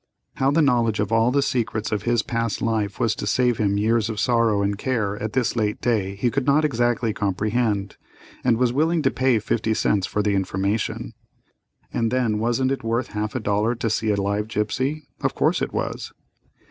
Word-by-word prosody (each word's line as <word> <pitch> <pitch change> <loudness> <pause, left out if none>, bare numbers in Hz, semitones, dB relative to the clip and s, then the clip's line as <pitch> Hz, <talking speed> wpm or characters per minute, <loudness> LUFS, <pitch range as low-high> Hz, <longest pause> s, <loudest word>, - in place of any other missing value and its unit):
How 135 - +2
the 155 +3 +3
knowledge 120 -6 +2
of 105 +1 -1
all 115 +1 +4
the 140 +2 +2
secrets 115 -5 -1
of 105 -2 0
his 120 +1 +1
past 115 -4 -2
life 110 -3 -1
was 115 -2 +2
to - - -5
save 125 -2 +2
him 100 -2 +1
years 110 +1 +1
of 110 -2 -4
sorrow 115 -4 +2
and 100 0 0
care 110 -3 -1
at 110 0 -3
this 125 -3 0
late 105 -2 0
day 105 -5 0
he 115 +5 0
could 140 0 -1
not 150 +2 +4
exactly 120 -4 +1
comprehend, 105 +1 -1 0.5
and 120 -3 +3
was 125 0 +2
willing 160 +3 +1
to 135 - +3
pay 130 -2 +2
fifty 110 +1 -1
cents 100 -3 +1
for 105 - -1
the 105 -1 +1
information. 100 +2 -1 0.8
And 115 -1 +1
then 115 -4 0
wasn't 120 +4 +1
it 135 - -2
worth 115 +2 -1
half 105 +1 -3
a - - 0
dollar 105 +2 0
to 115 -2 -2
see 110 0 0
a 100 -1 +1
live 100 +2 -1
gipsy? 120 +8 -2 0.2
Of - - -1
course - - +1
it - - -1
was. - - -4
115 Hz, 200 wpm, -23 LUFS, 105-125 Hz, 0.8 s, all